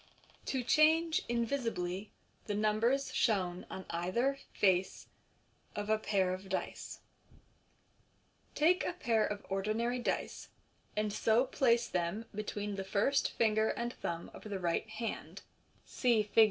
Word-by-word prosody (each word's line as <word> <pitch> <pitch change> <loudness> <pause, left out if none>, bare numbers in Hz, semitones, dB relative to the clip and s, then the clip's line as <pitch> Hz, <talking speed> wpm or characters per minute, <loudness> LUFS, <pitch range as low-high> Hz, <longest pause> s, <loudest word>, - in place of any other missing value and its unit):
To 260 -2 -1
Change, 315 +5 +4
invisibly, 230 -6 -1 0.4
the 205 - -1
Numbers 215 +6 +1
shown 185 -5 +1
on 190 - -7
either 235 +11 0
Face 190 -2 +1 0.7
of 205 +1 -2
a 220 - +3
Pair 190 -4 +1
of 190 +1 -7
Dice. - - -4 0.7
— - - -38
Take 350 +5 +4
a - - -1
pair 225 -8 +1
of 205 -1 -3
ordinary 215 +5 0
dice, 240 - -3 0.5
and 210 -1 0
so 230 +5 +3
place 240 -3 +2
them 180 +5 -2
between 205 -1 -4
the 195 - -2
first 205 +8 +1
ringer 220 -1 +3
and 235 +2 -2
thumb 170 0 -5
of - - -11
the 205 -2 -3
right 175 +4 -1
hand 220 +1 -5 0.4
(see 235 -4 +2
Fig. 210 +2 0
215 Hz, 135 wpm, -33 LUFS, 195-240 Hz, 0.7 s, Change